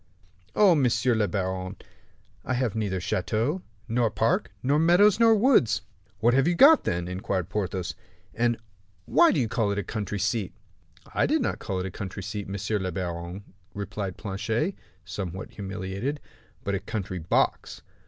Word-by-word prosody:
"Oh, 205 -4 +6
monsieur 125 -4 +2
le 110 -2 +2
baron, 95 +1 -3 0.7
I 130 - -1
have 125 -4 0
neither 100 -4 -1
chateau, 110 - -1 0.3
nor 115 0 +2
park, 110 -1 0
nor 140 +4 +3
meadows, 180 +6 +5
nor 225 -1 +6
woods." 215 - +3 0.4
"What 120 +2 +4
have 135 +3 +3
you 175 - +2
got, 300 - +7
then?" 85 0 -1
inquired 90 -1 -2
Porthos, 95 -4 -2 0.4
"and 120 0 +1 0.5
why - - +5
do - - +1
you 120 - +1
call 110 -2 0
it 100 - -1
a 100 - -1
country 105 +1 -4
seat?" 100 -1 -1 0.6
"I - - +2
did 315 +1 +2
not - - -1
call 95 -3 -3
it - - -4
a 95 - -4
country 95 +1 -6
seat, 105 0 -5
monsieur 100 +2 -1
le 95 -1 -2
baron," 85 +2 -5 0.3
replied 100 -1 -4
Planchet, 110 - -1 0.3
somewhat 95 -2 -5
humiliated, 100 +8 -4 0.4
"but 100 - -2
a 100 - 0
country 95 -3 -4
box." 80 - 0
105 Hz, 165 wpm, -26 LUFS, 95-125 Hz, 0.7 s, got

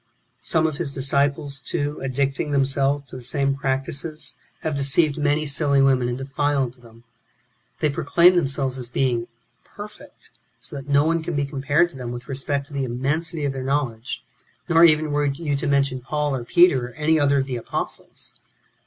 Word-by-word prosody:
6. - - -11
Some 160 -1 +3
of 155 -2 -1
his 150 -4 -2
disciples, 140 +1 0
too, 145 -1 -3
addicting 135 +3 -1
themselves^ 140 0 +1
to 130 - -9
the 130 - -7
same 140 +3 0
practices, 140 +3 -3 0.3
have 155 -2 -2
deceived 140 +2 +2
many 145 +1 +1
silly 140 -1 +1
women, 130 -3 +3
and 120 - -3
defiled 135 -1 -1
them. 115 0 -17 0.8
They 155 - +3
proclaim 175 +5 +4
themselves 135 -5 0
as 120 -2 -5
being 120 -2 0 0.2
" 125 0 -44
perfect," 205 - -11 0.3
so 125 +4 -10
that 135 +1 -9
no 140 0 +4
one 165 +1 +1
can 165 0 -4
be 145 0 +1
compared 145 +5 +1
to 135 - -11
them 125 -2 -5
with 120 +1 -7
respect 140 +1 -1
to 145 - -13
the 140 -1 -1
immen 130 +4 0
sity 165 -3 -4
of 140 - -1
their 135 - -4
knowledge, 130 -4 -2 0.4
nor 165 0 +5
even 155 -2 +5
were 145 0 +1
you 145 +1 -1
to 140 - -2
mention 140 -2 +1
Paul 150 +2 -1
or 120 -2 -5
Peter, 140 -6 +4
or - - -11
any 155 +1 +2
other 140 -1 +3
of 135 - +1
the 130 -2 -3
apostles. 115 - -5
140 Hz, 190 wpm, -23 LUFS, 135-150 Hz, 0.8 s, nor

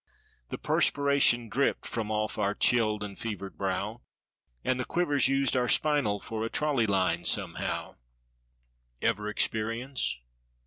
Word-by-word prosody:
The - - -4
perspiration 140 -4 +2
dripped 130 +6 0
from—off 110 -1 -2
our 100 0 +1
chilled 110 -4 +2
and 100 -2 -8
fevered 100 -4 -5
brow 100 +4 -3 0.6
And 130 0 0
the - - 0
quivers 145 -6 +2
used 135 0 +1
our 125 -1 +1
spinal 145 -10 +2
for 110 +1 -5
a 115 - -2
trolley 140 -6 +1
line 95 -2 +1
somehow— - - -1 1.1
Ever 105 +1 +1
experience 115 - -1
115 Hz, 125 wpm, -29 LUFS, 105-135 Hz, 1.1 s, perspiration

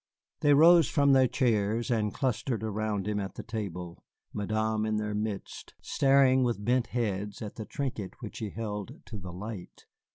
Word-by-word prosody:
They 145 -1 +5
rose 165 0 +7
from 140 -2 +4
their 130 -1 +5
chairs 115 0 +1
and 105 -3 +1
clustered 125 -3 -1
around 105 -2 -2
him 105 -1 0
at 95 -1 -5
the - - -6
table, 90 -6 -6 0.3
Madame 110 +1 -1
in 110 0 0
their 105 0 -2
midst, 105 -1 -5
staring 135 -1 +4
with 115 -4 -1
bent 125 0 +2
heads 105 -4 -2
at 105 -2 -6
the 110 - -7
trinket 120 -9 -4
which 110 -5 -8
he 110 -3 -3
held 105 - -6
to 110 - -7
the 90 -1 -7
light. 95 +1 -8
110 Hz, 170 wpm, -29 LUFS, 105-125 Hz, 0.3 s, rose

